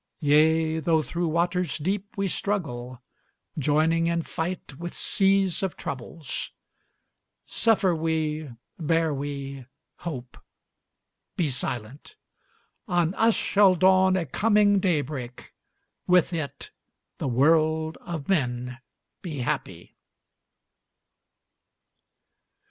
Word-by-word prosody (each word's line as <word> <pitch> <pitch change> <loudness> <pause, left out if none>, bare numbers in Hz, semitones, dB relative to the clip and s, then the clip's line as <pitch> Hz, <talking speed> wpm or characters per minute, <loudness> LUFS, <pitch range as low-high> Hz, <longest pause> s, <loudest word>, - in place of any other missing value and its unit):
Yea, 160 +2 +3
though 160 0 +2
through 170 +3 -2
waters 175 +2 0
deep 190 +6 -2
we 195 0 0
struggle, 130 -12 -3 0.6
Joining 155 +4 +2
in 170 0 0
fight 165 -5 -5
with 175 0 -6
seas 195 -1 +2
of 190 -3 -2
troubles. 135 +3 -5 1.0
Suffer 205 -5 +2
we, 155 -2 -1 0.3
bear 165 0 +1
we 140 -2 -5 0.3
hope 130 -7 -7 1.0
be 155 -5 0
silent! 125 - -5 0.7
On 175 -2 +1
us 225 +2 +3
shall 195 -2 +4
dawn 185 +1 +4
a 175 - -1
coming 205 - +3
daybreak 145 -9 -2 0.5
With 180 -1 +4
it, 155 -4 -5 0.5
the - - -2
world 155 +4 +2
of 165 -5 -6
men 125 -7 -1 0.4
be 155 -7 -5
happy! - - -4
160 Hz, 95 wpm, -26 LUFS, 145-180 Hz, 1.0 s, shall